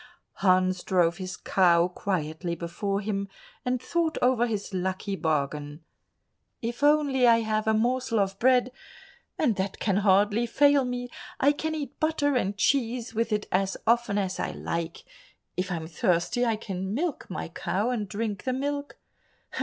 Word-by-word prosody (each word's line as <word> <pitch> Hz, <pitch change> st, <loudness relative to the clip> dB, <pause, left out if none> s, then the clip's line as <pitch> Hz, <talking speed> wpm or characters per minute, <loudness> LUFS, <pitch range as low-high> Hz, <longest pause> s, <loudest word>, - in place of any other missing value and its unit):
Hans 185 Hz, -1 st, +3 dB
drove 175 Hz, -2 st, +2 dB
his 185 Hz, -1 st, -5 dB
cow 175 Hz, -2 st, +3 dB
quietly 170 Hz, -2 st, -3 dB
before 195 Hz, +4 st, -3 dB
him, 200 Hz, -1 st, -3 dB, 0.3 s
and 250 Hz, -1 st, 0 dB
thought 325 Hz, +5 st, -1 dB
over 250 Hz, -1 st, +3 dB
his 205 Hz, -3 st, -4 dB
lucky 190 Hz, +2 st, -2 dB
bargain. 150 Hz, -1 st, -2 dB, 0.8 s
"If 235 Hz, +2 st, -4 dB
only 290 Hz, -4 st, +4 dB
I 230 Hz, -1 st, +5 dB
have 215 Hz, -1 st, -1 dB
a 220 Hz, -, +4 dB
morsel 245 Hz, 0 st, +1 dB
of 195 Hz, 0 st, -1 dB
bread—and 255 Hz, 0 st, -1 dB
that 190 Hz, 0 st, -2 dB
can 200 Hz, -3 st, 0 dB
hardly 205 Hz, +3 st, +3 dB
fail 285 Hz, +2 st, +4 dB
me—I 245 Hz, +3 st, -1 dB
can 315 Hz, +2 st, -3 dB
eat 290 Hz, -3 st, -6 dB
butter 310 Hz, -3 st, +1 dB
and 200 Hz, -4 st, 0 dB
cheese 240 Hz, -1 st, +1 dB
with 230 Hz, +1 st, -1 dB
it 210 Hz, 0 st, 0 dB
as 195 Hz, +1 st, +1 dB
often 235 Hz, -2 st, +2 dB
as 190 Hz, -2 st, -1 dB
I -, -, -2 dB
like; 170 Hz, 0 st, -4 dB, 0.5 s
if 185 Hz, +1 st, -2 dB
I -, -, 0 dB
am 160 Hz, -1 st, -5 dB
thirsty, 180 Hz, +8 st, +1 dB
I 225 Hz, -, +2 dB
can 190 Hz, -1 st, -4 dB
milk 325 Hz, +2 st, -2 dB
my 185 Hz, -, -4 dB
cow 200 Hz, +7 st, -1 dB
and 215 Hz, -5 st, -2 dB
drink 210 Hz, -1 st, -3 dB
the 255 Hz, -, 0 dB
milk. 285 Hz, +2 st, -3 dB
215 Hz, 155 wpm, -27 LUFS, 185-250 Hz, 0.8 s, I